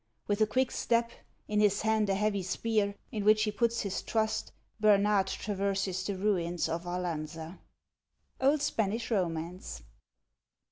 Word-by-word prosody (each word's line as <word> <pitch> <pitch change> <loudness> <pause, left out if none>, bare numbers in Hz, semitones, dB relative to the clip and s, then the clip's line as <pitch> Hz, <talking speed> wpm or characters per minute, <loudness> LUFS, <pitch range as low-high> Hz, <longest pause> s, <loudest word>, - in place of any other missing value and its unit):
With 205 +1 0
a 215 - +5
quick 255 +3 +1
step, 235 0 +1 0.4
in 210 0 +1
his 205 -1 +3
hand 220 -2 +2
a 195 - +2
heavy 205 0 +1
spear, 200 +2 0 0.2
in 210 -2 -2
which 215 +1 +5
he 210 - 0
puts 235 +2 +1
his 200 -2 -2
trust, 220 -1 -1 0.3
Bernard 205 -2 +4
traverses 195 -2 -1
the 200 -2 -2
ruins 175 -4 0
of 165 +2 -3
Arlanza. 165 -1 -4 0.4
— - - -29
Old 280 +2 +3
Spanish 225 +2 -1
Romance. 170 - -2
205 Hz, 145 wpm, -30 LUFS, 185-215 Hz, 0.4 s, a